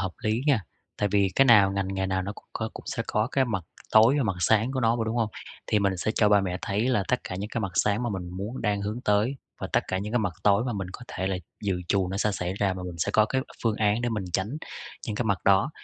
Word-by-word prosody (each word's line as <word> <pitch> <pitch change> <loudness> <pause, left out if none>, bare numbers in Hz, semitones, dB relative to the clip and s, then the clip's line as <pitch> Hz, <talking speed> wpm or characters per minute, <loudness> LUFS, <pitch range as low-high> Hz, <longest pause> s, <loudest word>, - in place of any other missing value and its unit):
hợp 95 -2 -1
lý 110 +2 +1
nha, 135 -7 +4 0.4
tại 105 - +1
vì 100 -1 +4
cái 135 - +6
nào, 105 -6 +6
ngành 100 -1 -1
nghề 95 0 -1
nào 95 0 0
nó 100 +2 -4
cũng - - -15
có - - -3
cũng - - -10
sẽ - - -2
có 110 +2 0
cái 135 - +3
mặt 110 -8 -2 0.3
tối 110 +4 +7
và 140 - +2
mặt 95 -4 -1
sáng 110 +8 +3
của 130 - -1
nó 115 0 +3
mà, 115 - -1
đúng 110 +1 -2
hông? 115 -2 +1 0.4
Thì 105 - +2
mình 100 -2 +1
sẽ 110 - -1
cho 105 - +4
ba 105 -1 +5
mẹ 90 -1 -2
thấy 105 +5 0
là 125 -6 +2
tất 125 - +1
cả 90 - -5
những 100 +2 -4
cái 115 - -2
mặt 95 -4 -3
sáng 105 +3 +2
mà 120 - -1
mình 90 -3 -4
muốn 105 +7 -5
đang 105 -2 +1
hướng 105 +4 -3
tới, 105 +6 +2 0.2
và - - -2
tất - - +4
cả 95 - 0
những 105 +3 -4
cái 120 - +3
mặt 105 -6 -1
tối 100 +2 +4
mà 125 - -1
mình 95 -3 -4
có - - -9
thể 95 - -3
là 95 -1 0 0.3
dự 95 -3 -1
trù 95 -2 +2
nó 95 - -3
sẽ 105 +1 +1
xảy 90 -1 -2
ra, 100 -2 0
và 90 - -6
mình 90 -2 -6
sẽ - - 0
có 110 - +5
cái 130 +3 0 0.2
phương 115 -3 +1
án 105 +1 +2
để 120 - +1
mình 105 -4 -2
tránh 105 - -1 0.5
những 110 -3 -3
cái 120 - -1
mặt 100 -4 +1
đó. 100 +9 +4
105 Hz, 300 wpm, -27 LUFS, 95-115 Hz, 0.5 s, tối